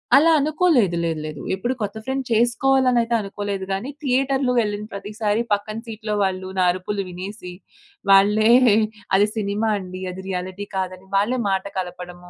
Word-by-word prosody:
అలా 325 +4 +6
అనుకోలేదు. 295 - +2
లేదు. 160 -2 -1
లేదు. 155 -2 -6
ఎప్పుడు 240 +7 -2
కొత్త 205 +1 -3
ఫ్రెండ్ 265 0 -2
చేసుకోవాలి 255 +3 +3
అనైతే 235 -1 +2
అనుకోలేదు 200 -1 -4
గానీ 215 +8 -3
థియేటర్‌లో 265 0 +1
వెళ్ళిన 210 -1 -1
ప్రతిసారి 210 +2 -2
పక్కన 215 +2 -2
సీట్‌లో 215 -1 -4
వాళ్ళు 185 -1 -2
నా 185 - +3
అరుపులు 195 +3 -3
వినేసి 180 +1 -7 0.6
వాళ్ళే 210 +3 +5 0.6
అది 205 +2 +4
సినిమా 210 +2 0
అండి. 185 -1 -7
అది 185 +1 -8
రియాలిటీ 185 +2 -4
కాదని 185 0 -4
వాళ్ళే 220 +6 +2
మాట 190 0 0
కలపడము 180 -1 -6
205 Hz, 145 wpm, -22 LUFS, 185-235 Hz, 0.6 s, అలా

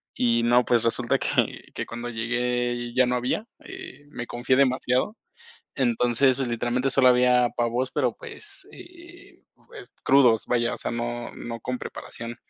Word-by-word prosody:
Y 115 -1 +2
no, 120 +1 +4
pues, 120 -2 +2
resulta 115 - +1
que - - 0
que - - -3
cuando 120 +1 -6
llegué 120 +1 -2
ya 130 - +5
no 125 - +1
había, 125 - -1 0.2
eh, 380 - -10
me 120 -5 -6
confié 120 +2 0
demasiado, 130 - +1 0.6
entonces, 125 +1 +2
pues, 135 - -1
literalmente 120 +3 0
solo 130 -1 +6
había 125 0 +4
pavos, 120 +2 0
pero, 130 -5 0
pues, 395 -2 -8
eh, 345 -1 -13 0.2
pues, 435 -5 -12
crudos, 125 -5 +5
vaya, 120 -1 +1
o - - -5
sea, - - -3
no 120 0 -4
no 115 -1 -6
con 125 +2 -3
preparación. 120 -1 -8
125 Hz, 160 wpm, -25 LUFS, 120-135 Hz, 0.6 s, solo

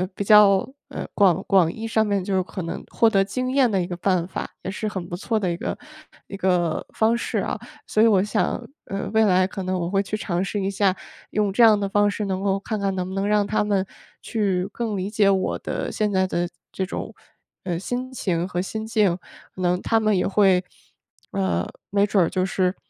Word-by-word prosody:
比 200 - -2
较， 200 -2 +6 0.2
呃， - - -5
广 190 -3 +4
广 180 -4 +4
义 225 0 -6
上 220 -1 +2
面 200 -3 0
就 190 -1 0
可 185 - -6
能 165 - -5
获 230 - +3
得 195 -3 +3
经 255 +6 -3
验 265 -3 +4
的 190 -2 +1
一 175 - -3
个 175 - -4
办 180 -1 0
法， - - -5
也 190 - -3
是 215 - -5
很 185 -4 -4
不 175 - -5
错 220 +4 -1
的 185 -4 -1
一 - - -1
个 - - -4 0.5
一 195 - -7
个 180 -4 0
方 225 +1 +2
式 - - -3
啊。 - - -2 0.3
所 215 - +3
以 230 - +7
我 195 -4 +4
想， 215 +3 0 0.3
呃， 195 0 -4
未 220 0 +5
来 185 -2 +4
可 195 -1 -6
能 185 0 -1
我 170 0 -2
会 195 +1 +1
去 210 +2 -3
尝 180 -3 -1
试 200 +1 -2
一 195 - 0
下 195 -1 +2 0.4
用 205 -2 0
这 235 - +5
样 215 -2 +7
的 200 - -1
方 205 +1 +2
式， 210 - -3
能 190 0 -2
够 195 0 +1
看 215 +2 -3
看 195 -1 0
能 180 0 -2
不 190 - -6
能 195 0 0
让 210 -1 +2
他 215 - +1
们 200 -2 +1 0.4
去 195 -4 -1
更 225 -4 -2
理 190 +2 -2
解 210 -2 +3
我 190 -1 +1
的 - - -3
现 210 -1 -1
在 190 -1 +2
的 175 -1 -1 0.2
这 190 - -2
种， - - -6 0.5
呃， 175 -3 -2
心 250 +6 -4
情 180 -8 -1
和 180 -1 -2
心 220 +3 -4
境， 210 -6 +2 0.4
可 185 - -7
能 180 0 +1
他 225 0 +2
们 215 -2 +2
也 180 - +1
会 190 -2 +4 0.7
呃， 85 -3 0 0.2
没 200 0 +3
准 200 -2 +2
儿 - - -2
就 185 0 0
是 185 -1 0
195 Hz, 245 characters per minute, -23 LUFS, 185-210 Hz, 0.7 s, 以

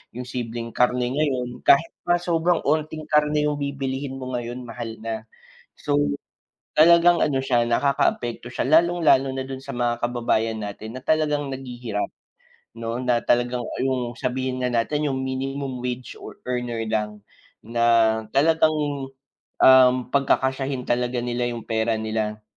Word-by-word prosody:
yung 125 - -4
simpleng 120 -2 -5
karne 125 +1 +1
ngayon, 130 -4 -1
kahit 165 +4 +5 0.2
nga 175 - +4
sobrang 175 -1 +1
unting 155 +1 -1
karne 150 0 +3
yung 150 -1 0
bibilihin 135 -1 -3
mo 130 -1 -6
ngayon, 120 +1 -4
mahal 115 -1 -6
na. 110 -1 -5 0.5
So, - - 0 0.8
talagang 170 +2 +6
ano 140 -3 +2
siya, 120 -2 +3
nakakaapekto 120 -2 0
siya 125 - -2
lalong-lalo 160 -3 +4
na 130 - -3
do'n 135 0 -7
sa 140 - -14
mga 120 -1 -1
kababayan 115 -2 0
natin 110 +3 -7
na - - -8
talagang 150 -2 +1
naghihirap 120 -5 -4 0.7
'no? 115 +2 -3
Na 125 -2 +2
talagang, 120 0 +1
ah, - - -5
yung 125 -2 -1
sabihin 130 0 -3
na 125 - 0
natin 145 +5 0
yung 130 0 -2
minimum 135 -1 -4
wage 125 0 -4
or - - -10
earner 120 -2 -2
lang, 105 -1 -2 0.5
na 115 -1 +3
talagang, 150 -1 +1 0.5
um, 130 -1 +8 0.2
pagkakasyahin 135 -1 +1
talaga 120 0 -1
nila 120 0 -1
yung 120 -2 -5
pera 110 0 0
nila 110 -1 -3
125 Hz, 145 wpm, -23 LUFS, 120-140 Hz, 0.8 s, um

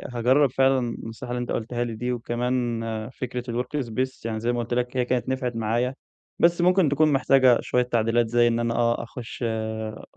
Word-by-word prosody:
هاجرّب 130 +4 +4
فعلًا 135 0 +3
النصايح 120 0 -6
اللي 125 0 -2
أنت 120 - -4
قُلتها 120 +2 -2
لي 115 -2 -4
دي 125 +3 -2
وكمان 120 0 -1 0.3
فكرة 125 -1 -5 0.2
الWork 135 +1 -3
Space، 130 +3 -3
يعني 110 -1 -2
زي 115 +2 0
ما 120 - -2
قُلت 120 +1 -3
لك 125 +1 -1
هي 125 - +2
كانت 125 0 -1
نفعت 130 -2 -2
معايا، 115 +3 0 0.4
بس 170 +1 +4
ممكن 180 -2 +4
تكون 150 +2 +3
محتاجة 130 -2 +5
شوية 125 - +1
تعديلات 115 -1 +1
زي 120 +1 +3
إن 115 0 +1
أنا 115 0 0
آه، 120 0 +1
أخُش 120 +1 -8
أ 110 -1 -4
120 Hz, 195 wpm, -25 LUFS, 115-130 Hz, 0.4 s, محتاجة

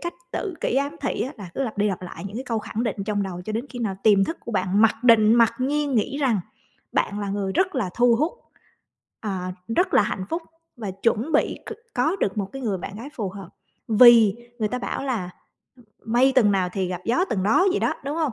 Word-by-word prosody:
cách 345 0 -4 0.2
tự 375 -5 -3
kỷ - - 0
ám 280 +3 -1
thị 270 - -2
á, 260 - -4
là 190 -4 -8
cứ 275 - -1
lặp 220 -5 -4
đi 210 +1 +3
lặp 185 -2 -3
lại 180 - -8
những 205 +3 -8
cái 260 - -4
câu 230 -3 -1
khẳng 220 +1 -4
định 225 0 -2
trong 205 -1 -1
đầu 180 -2 -5
cho 215 - -4
đến 230 +5 -3
khi 245 - -7
nào 205 -5 -2
tiềm 200 -2 +5
thức 330 - -4
của 235 - -7
bạn 190 +1 +2
mặc 225 - +5
định, 225 -2 +6
mặc 230 -2 +5
nhiên 285 +1 0
nghĩ 265 +6 0
rằng 245 -8 +2 0.5
bạn 205 - 0
là 200 - -3
người 195 -1 -2
rất 375 - +1
là 215 -9 -1
thu 240 -1 +4
hút, 310 +8 0 0.9
à, 185 -4 -3 0.2
rất 360 - +2
là - - +6
hạnh 195 -2 -3
phúc 330 +1 -2 0.3
và 215 -5 -5
chuẩn 230 +9 -1
bị 300 - +2
c - - -5 0.2
có 310 +9 +1
được 205 - -1
một 200 - -1
cái 270 -1 -7
người 205 -5 -1
bạn 195 +3 -7
gái 245 +6 -7
phù 210 -5 -3
hợp. 195 -2 -9 0.4
Vì 225 -2 +7 0.2
người 215 -1 0
ta 250 - -3
bảo 260 - -4
là, 215 -9 -2 0.7
ưm, 225 - -8
"mây 260 +3 +4
tầng 215 -6 +5
nào 185 -2 +1
thì 190 -2 -1
gặp 180 -1 -4
gió 295 +11 +2
tầng 190 -3 0
đó" 225 - +4
vậy 385 - 0
đó, - - +1
đúng 285 +3 -3
hông? 310 -7 0
225 Hz, 250 wpm, -24 LUFS, 200-265 Hz, 0.9 s, Vì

